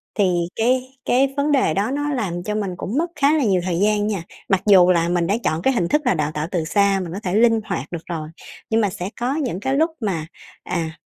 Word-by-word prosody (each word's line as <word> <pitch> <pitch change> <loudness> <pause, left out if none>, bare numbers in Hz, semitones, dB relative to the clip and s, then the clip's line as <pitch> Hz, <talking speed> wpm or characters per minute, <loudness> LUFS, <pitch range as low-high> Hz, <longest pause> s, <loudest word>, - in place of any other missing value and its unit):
thì 180 -4 +1
cái 255 +3 0
cái 270 +2 +2
vấn 290 +1 +1
đề 260 - +3
đó 205 +7 0
nó 290 +1 -1
làm 175 -8 -2
cho 210 +2 -3
mình 200 -4 -2
cũng 230 +9 -3
mất 335 +2 +1
khá 290 +1 +3
là 285 - +1
nhiều 190 -5 +2
thời 175 -1 -1
gian 210 0 +2
nha. 195 -6 -2 0.3
Mặc 190 -2 +2
dù 185 -3 +7
là 170 -1 +2
mình 175 -1 +1
đã 205 - +2
chọn 160 -1 0
cái 265 - +2
hình 175 -7 0
thức 300 0 +2
là - - +3
đào 155 -2 -1
tạo 150 +1 -3
từ 170 -4 0
xa 200 +2 +2
mình 170 0 -7
có 200 - -4
thể 185 +1 -1
linh 225 0 +4
hoạt 135 - -4
được 170 -2 -6
rồi, 155 -2 -4 0.4
nhưng 225 0 +2
mà 205 - +1
sẽ 180 +1 -5
có 255 +4 0
những 255 - -2
cái 265 +4 -1
lúc 320 +2 +2
mà, 175 -8 -2 0.4
à, 165 -2 -3
200 Hz, 260 wpm, -21 LUFS, 175-250 Hz, 0.4 s, dù